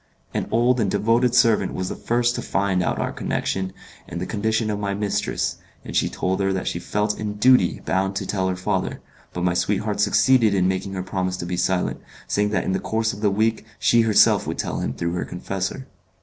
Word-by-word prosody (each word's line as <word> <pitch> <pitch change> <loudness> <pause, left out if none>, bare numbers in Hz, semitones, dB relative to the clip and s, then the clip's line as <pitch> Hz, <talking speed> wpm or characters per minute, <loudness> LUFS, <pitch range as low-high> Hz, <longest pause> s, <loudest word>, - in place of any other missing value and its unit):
An - - -2
old 120 +2 +2
and 105 -4 +1
devoted 115 +5 +2
servant 115 -6 +3
was 95 - -2
the - - -4
first 120 +1 +1
to - - -3
find 100 -2 0
out 85 - 0
our - - -1
connection 95 -1 -2 0.4
and 85 - -5
the 90 - -3
condition 110 +1 0
of 105 - -2
my 100 -1 -2
mistress, 105 0 -1 0.3
and - - -7
she - - +2
told 95 +1 -1
her 95 0 +1
that 95 -1 -2
she 85 - -2
felt 105 +4 -1
in 105 -1 -3
duty 125 -3 +4
bound 95 +1 0
to - - -2
tell 95 -2 -1
her 90 - -1
father, 90 - -2 0.3
but 90 - -4
my 90 -1 +2
sweetheart 105 +3 0
succeeded 110 +1 +4
in 90 -1 +2
making 95 +1 -2
her 95 -1 -3
promise 95 0 -2
to 85 - -5
be 90 +1 -2
silent, 90 +1 0 0.2
saying 105 0 +1
that 105 - 0
in - - -1
the 95 - 0
course 110 +1 -1
of 105 - -9
the 105 - +3
week 110 +3 +1
she 120 - +4
herself 110 -2 +4
would - - -3
tell - - -2
him - - -2
through 85 +4 -2
her 90 - -1
confessor. 95 +8 -4
100 Hz, 220 wpm, -23 LUFS, 95-110 Hz, 0.4 s, duty